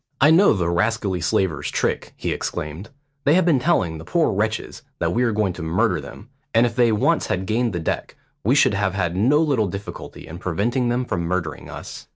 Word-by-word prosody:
"I 150 +3 +6
know 185 +5 +6
the 90 -5 -1
rascally 95 +1 0
slavers' 75 -5 0
trick," - - -2
he - - -2
exclaimed; 80 +7 -4 0.3
"they 145 - +4
have 185 -1 +3
been 160 -7 +4
telling 95 - +1
the - - -9
poor 170 - +1
wretches 110 +2 -2 0.2
that - - -1
we 120 - +1
are 120 -2 +2
going 105 -3 0
to 90 - -8
murder 90 +2 +1
them; 105 - -11 0.3
and 115 +1 +6
if 115 -2 -2
they 120 -2 +4
once 105 - +1
had 95 +1 -1
gained 115 +4 0
the 90 - -3
deck, 80 - -3 0.3
we 125 +7 +3
should 145 - +4
have 95 -1 0
had 90 -3 -1
no 125 +10 +3
little 140 -10 +2
difficulty 100 +2 -8
in 85 +2 -9
preventing 115 +8 0
them 125 +1 0
from 90 - -2
murdering 85 -2 -3
us." - - -9
105 Hz, 210 wpm, -22 LUFS, 90-120 Hz, 0.3 s, I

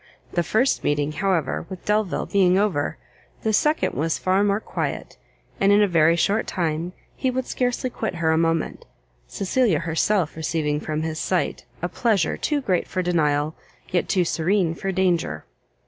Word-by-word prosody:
The 175 - +2
first 220 +9 +1
meeting, 145 0 0
however, 170 -2 -1
with 190 -2 -9
Delvile 210 -3 0
being 185 -2 +3
over, 195 -8 0 0.5
the 220 - +1
second 300 +8 +2
was 160 +3 0
far 190 +2 +2
more 205 0 +2
quiet, - - -4 0.4
and 195 +1 +4
in 205 - +6
a - - +3
very 165 -2 +4
short 200 +6 +1
time, 170 0 -2 0.2
he 260 - 0
would 255 0 -2
scarcely 250 0 -1
quit 220 -6 -3
her 160 -1 +1
a - - +3
moment, 165 0 0 0.4
Cecilia 200 - +1
herself 170 +2 0
receiving 155 -2 -1
from 155 0 -3
his 160 0 -3
sight - - -1 0.2
a - - +2
pleasure 210 -9 +1
too 295 -2 -1
great 185 -9 0
for 185 -1 -2
denial, 155 -3 +1 0.4
yet 175 - 0
too 180 -2 +2
serene 170 +1 +1
for 195 +3 -3
danger. 185 -3 0
180 Hz, 165 wpm, -23 LUFS, 160-205 Hz, 0.5 s, in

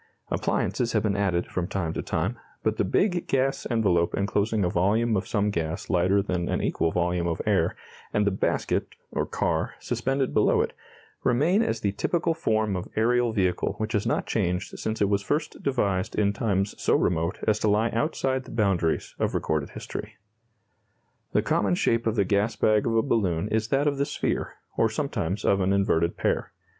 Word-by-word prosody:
Appliances 120 -2 0
have 110 - +2
been 105 -2 +1
added 95 -4 +1
from 90 -1 -3
time 85 -5 -2
to - - -2
time, 95 +10 -2 0.2
but 110 0 0
the - - +2
big 175 - +1
gas 135 0 0
envelope 95 -8 +2
enclosing 100 +1 +1
a - - +1
volume 110 +6 +2
of 95 - -1
some 105 -1 +1
gas 80 -3 -3
lighter 95 +3 +3
than 90 -3 -2
an - - 0
equal 85 - 0
volume 90 0 0
of 85 - -2
air, - - +2 0.4
and 105 - +1
the 100 - +2
basket, 95 - -1 0.2
or - - -1
car, - - -1
suspended 135 0 -1
below - - +3
it, - - -2 0.5
remain 155 - +3
as 115 - -1
the 100 - +1
typical 165 - 0
form 110 -9 0
of 90 - -4
aerial 120 +2 +2
vehicle 95 -4 0
which 110 +1 -3
has 105 -2 0
not - - 0
changed 90 +1 -2
since 110 0 -3
it - - +3
was 100 0 +1
first 150 +9 -2
devised 100 -9 0
in 100 -1 +2
times 100 -2 0
so - - +3
remote 85 +2 +1
as 110 -1 +3
to 110 - +1
lie 110 +3 +2
outside 130 0 -1
the - - -11
boundaries 95 -7 0
of - - 0
recorded 75 -2 -1
history. - - -7 1.2
The - - +3
common 95 -3 +1
shape 115 +5 +1
of 110 - +1
the 100 -3 +2
gas 100 +4 +1
bag 110 +1 +2
of 115 - +1
a 115 - +3
balloon 100 -7 0
is 110 0 0
that 135 +4 +1
of 145 -2 0
the 140 - +2
sphere, 145 - -2 0.2
or - - +3
sometimes 90 +5 -2
of 100 0 +3
an 95 +1 +2
inverted 85 -4 +1
pear. - - -1
105 Hz, 190 wpm, -26 LUFS, 95-115 Hz, 1.2 s, lighter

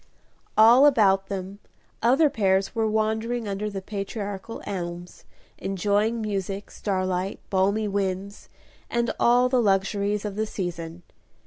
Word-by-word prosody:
All 235 +6 +8
about 195 -7 +3
them 195 +1 -5 0.4
other 265 +7 +4
pairs 195 -7 +1
were 225 -2 0
wandering 220 +2 -1
under 200 +1 -3
the 195 -2 -6
patriarchal 200 +1 -5
elms, 175 -3 -6 0.3
enjoying 205 +4 0
music, 200 -1 -4
starlight, 185 -1 -2
balmy 200 +3 +2
winds, 195 0 -3 0.4
and 235 -1 0
all 245 +1 +4
the 250 -1 +2
luxuries 200 0 +1
of 205 -2 -4
the 215 +1 -1
season. 175 -3 -5
200 Hz, 120 wpm, -25 LUFS, 190-220 Hz, 0.4 s, All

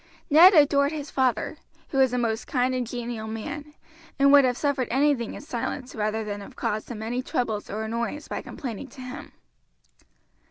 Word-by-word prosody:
Ned 350 +6 +9
adored 285 -1 +5
his 295 -2 -6
father, 260 +2 0 0.3
who 270 - -1
was 260 -2 +5
a 250 - -1
most 230 -2 -1
kind 255 0 +1
and 250 -2 -1
genial 235 -2 -5
man, 290 +7 -6 0.4
and 275 0 +5
would 285 -1 +8
have 250 -1 +1
suffered 285 -4 0
anything 265 -2 +1
in - - -8
silence 255 -1 -4
rather 215 0 -1
than 205 -1 -5
have 200 - -11
caused 215 +1 -3
him 220 -3 -6
any 245 +3 -2
troubles 225 -5 -2
or 215 +2 -3
annoyance 235 +6 -3
by - - -4
complaining 250 0 -6
to 260 +1 -12
him. 255 0 -8
250 Hz, 185 wpm, -26 LUFS, 225-280 Hz, 0.4 s, Ned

